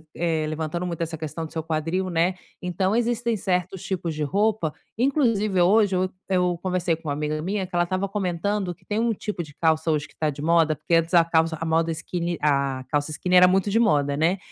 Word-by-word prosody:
eh, 160 -2 0
levantando 155 +3 -3
muito 170 -2 -4
essa 165 0 -3
questão 160 +1 -5
do 155 - -11
seu 160 - -3
quadril, 165 +4 -1
né. 175 +2 +1 0.3
Então, 185 +3 0
existem 235 0 0
certos 180 -1 -1
tipos 175 -4 -3
de 155 - -2
roupa, 200 0 0 0.2
inclusive 230 -7 +2
hoje 200 +2 +4
eu 185 0 +1 0.2
eu 180 -2 +1
conversei 180 -2 0
com 160 -2 -7
uma - - 0
amiga 150 +1 -2
minha 190 +3 -2
que 180 - -8
ela 175 - +4
estava 185 +2 -1
comentando 195 0 -2
que - - -30
tem 210 +1 -1
um 230 0 +1
tipo 205 -3 -4
de 145 -3 -13
calça 160 0 +1
hoje 150 -1 -1
que - - -24
tá 155 - 0
de 145 0 -6
moda, 160 -1 +3
porque 160 - -4
antes 165 +2 +1
a 170 - +7
calça 160 -1 +1
a 165 - -3
moda 165 +1 +1
skinny 170 +1 -3
a 140 -3 +1
calça 145 0 0
skinny 180 +4 0
era 180 0 +8
muito 190 +2 +2
de 220 +3 +2
moda, 145 -11 +2
né. 165 +6 +2
175 Hz, 225 wpm, -24 LUFS, 160-190 Hz, 0.3 s, era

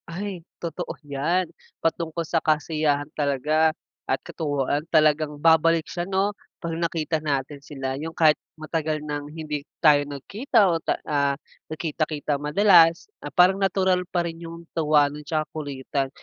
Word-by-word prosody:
Ay 190 +1 -5 0.2
totoo 170 -1 -5
yan. 150 +6 0 0.4
Patungkol 165 0 -1
sa 165 +1 0
kasiyahan 150 -2 +1
talaga 150 +2 +2 0.4
at - - +1
katuwaan 145 -2 -1
talagang 155 -1 +3
babalik 165 +1 +4
siya 175 +1 -5
'no? 195 +2 +1 0.3
Pag 165 -1 -3
nakita 165 -1 -1
natin 140 -1 -2
sila 135 -2 -4
yung 160 +1 -5
kahit 155 -2 +5 0.2
matagal 155 0 -2
nang 145 -1 -4
hindi 150 -1 -4 0.2
tayo 150 -3 +6
nagkita 205 - +1
o 165 - -1
ta - - 0
ah, 140 -2 +1 0.3
nagkita-kita 155 -2 -2
madalas. 165 +1 +5 0.2
Ah, - - -5
parang 190 +2 +4
natural 190 -1 +2
pa 175 -1 0
rin 165 0 -8
yung 170 0 -9
tuwa 150 -2 +4
nun, 150 +1 -8
'tsaka 155 0 -1
kulitan. 140 -2 -3
155 Hz, 145 wpm, -24 LUFS, 145-170 Hz, 0.4 s, tayo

